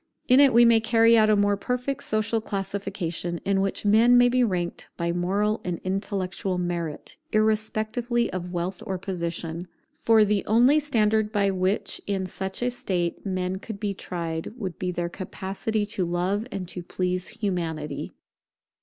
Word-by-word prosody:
In 255 +2 +6
it 280 -2 +7
we 235 +1 +6
may 230 -1 +6
carry 230 +1 +4
out 215 -1 +5
a 215 - +5
more 205 0 +3
perfect 250 +6 -2
social 225 -5 0
classification, 195 -4 -3
in 195 -1 +2
which 195 +1 -2
men 230 +4 +6
may 245 0 +6
be 250 0 +3
ranked 180 -6 -2
by 170 0 -1
moral 200 +5 0
and 175 -2 -3
intellectual 190 -1 -2
merit, 170 -3 -4
irrespectively 220 +2 +1
of 180 -1 -4
wealth 175 +1 -3
or 190 - -2
position. 170 -2 -4 0.3
For 220 -2 +5
the 205 -1 +1
only 245 +8 +5
standard 220 -6 +1
by 200 -2 +2
which 185 +2 0
in 195 -2 -1
such 190 +4 -4
a 245 - +1
state 180 -5 -2
men 185 0 -1
could 210 0 -7
be 205 -1 -1
tried 165 -2 -5
would 190 -7 -5
be 180 - -2
their 175 -1 -2
capacity 195 +4 -3
to 205 -2 -1
love 180 +6 -1
and 190 -4 -4
to 180 - -5
please 180 +1 -2
Humanity. 165 -7 -3
195 Hz, 165 wpm, -25 LUFS, 180-220 Hz, 0.3 s, it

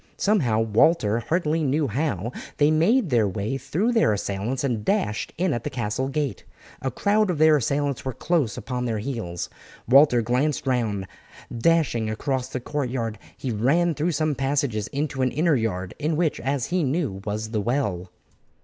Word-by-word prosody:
Somehow, 135 - +2
Walter 115 +1 +3
hardly 160 +4 0
knew 145 +1 +1
how, 120 - -2 0.3
they 145 +1 +4
made 175 - +3
their 115 -4 +3
way 100 +6 -2
through 165 - 0
their 225 - +3
assailants 105 +6 -2
and 120 -6 -1
dashed 150 - 0
in 180 -1 +1
at 120 - -3
the - - -2
castle 120 0 -2
gate. 140 0 -2 0.4
A 135 - -1
crowd 205 - +1
of 175 - 0
their 155 0 +6
assailants 140 +1 -1
were 130 - -2
close 155 -8 0
upon 125 -1 -3
their 115 -2 -1
heels. 105 -7 -4 0.4
Walter 125 -1 +6
glanced 130 +7 0
round; 115 -7 0 0.5
dashing 120 -5 +2
across 130 +3 -2
the 130 - -4
courtyard 125 -5 -3 0.2
he 130 - -3
ran 145 +11 +2
through 155 +4 -1
some 155 +1 +1
passages 135 -6 -1
into 140 -1 -3
an 130 - +3
inner 155 +4 +2
yard, 95 -6 -2
in 155 +2 0
which, 165 -3 +1
as 135 -2 -1
he 185 - +2
knew, 135 - -1
was 110 +1 -4
the 110 -2 0
well. 100 -7 -1
135 Hz, 170 wpm, -24 LUFS, 110-155 Hz, 0.5 s, their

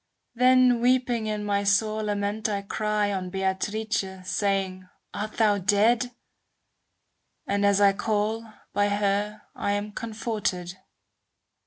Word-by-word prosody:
Then 250 0 +4
weeping 245 -2 +2
in 210 -1 -2
my 200 -1 0
sore 215 +2 +2
lament 205 +1 -1
I 200 -1 -2
cry 210 0 -1
On 185 -2 -3
Beatrice, 195 +4 -1 0.2
saying, 190 -2 -1 0.2
"Art 215 +1 -4
thou 210 -3 +3
dead? 220 +6 +3 0.7
" - - -50
And 200 0 0
as 200 0 +4
I 200 -1 +5
call, 220 +2 -1 0.2
by 205 0 +2
her 205 +1 -1
I'm 205 +1 -2
comforted. 210 -5 -3
210 Hz, 120 wpm, -26 LUFS, 200-220 Hz, 0.7 s, I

